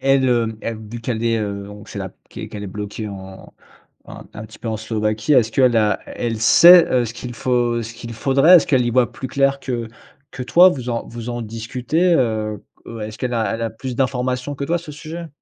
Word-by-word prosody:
elle, 135 0 +3
heu, 115 -2 +1
elle 115 -1 -4
vu 115 +2 -7
qu'elle 115 -1 -3
est, 115 -1 +1
heu, 100 -2 -4
donc, 105 +1 -12
c'est - - -7
là - - -5 0.2
qu'e - - -7
qu'elle 105 - -8
est - - -5
bloquée 105 +2 -6
en 95 -1 -10 0.5
un - - -10
un 110 +1 -8
petit 110 - -15
peu, 115 - -5
en 110 - -1
Slovaquie. 110 +3 -1
Est-ce 120 -5 +4
qu'elle 125 0 +3
a 105 -3 +2
elle 115 -2 -4
sait, 170 +8 +8
heu, 125 -1 +3
ce 115 - -6
qu'il 120 0 -7
faut 120 -1 0
ce 115 +1 -7
qu'il 115 0 -9
faudrait? 135 +9 +5
Est-ce 165 - +3
qu'elle 130 -3 +3
y - - 0
voit 125 0 +2
plus 135 0 -7
clair 135 +1 +1
que 120 -4 -4 0.4
que 130 - -7
toi? 175 +8 +7
Vous 130 -8 -3
en 115 -1 -3
vous 115 0 -7
en 120 0 -3
discutez? 125 +10 -1
Heu 110 -6 -1 0.2
heu, 115 -1 -8
est-ce 105 0 -6
qu'elle 125 -1 -2
a 110 -4 0
elle 115 - -4
a 115 - -1
plus 125 +3 -7
d'informations 130 +1 -1
que 140 - -7
toi 170 +4 0
à - - -2
ce 165 -3 -10
sujet? 165 +3 -8
120 Hz, 240 wpm, -20 LUFS, 110-130 Hz, 0.5 s, sait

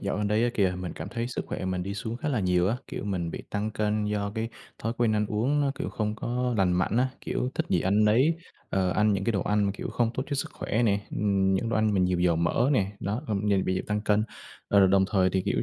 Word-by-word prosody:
dạo 100 - -2
gần 105 0 0
đây 110 +3 +2
á 120 - +1
kìa, 95 -3 +2
mình 90 -3 -4
cảm 80 +5 -7
thấy 115 +1 -3
sức 125 - -4
khỏe - - -4
mình 95 -1 -1
đi 100 +2 -4
xuống 110 +3 -4
khá 130 - -3
là 125 -7 0
nhiều 90 0 +2
á, 115 - 0
kiểu - - -5
mình 90 -5 -2
bị - - -6
tăng 105 +1 -1
cân 105 0 0
do 105 -1 -1
cái 115 +1 -2 0.3
thói 115 - -1
quen 120 -2 +3
ăn 105 -1 +1
uống 125 +9 +1
nó, 140 -1 +2
kiểu, - - -4
không 105 -1 -2
có 125 +2 -1
lành 95 -2 +3
mạnh 90 +4 +1
á, 130 +2 +3
kiểu, 125 - -2
thích - - -1
gì 90 - +2
ăn 100 +4 +3
nấy, 125 +10 +4 0.4
ờ, 95 -1 +1
ăn 105 +3 +3
những 95 -1 -1
cái 115 - +1
đồ 100 -4 0
ăn 105 0 +1
mà, 100 - +1
kiểu, - - -5
không 120 -2 +1
tốt 130 - -1
cho 145 - -2
sức - - -2
khỏe 110 - -1
nè, 100 -3 +2
ừm, 95 -2 +1
những 115 +4 0
đồ 115 - 0
ăn 110 -1 +2
mà 95 - +3
nhiều 90 -1 +2
dầu 90 -2 +3
mỡ 85 +9 +2
nè, 100 -6 +1
đó, 105 +7 -2
ờm, 105 -2 -1
giờ 100 - +4
bị 95 0 0
tăng 105 0 -1
cân. 105 0 +2 0.4
Ờ, 100 -1 +6
đồng 95 0 +4
thời 95 -2 +3
thì, 95 0 0
kiểu, 100 - 0
105 Hz, 285 wpm, -27 LUFS, 95-110 Hz, 0.4 s, Ờ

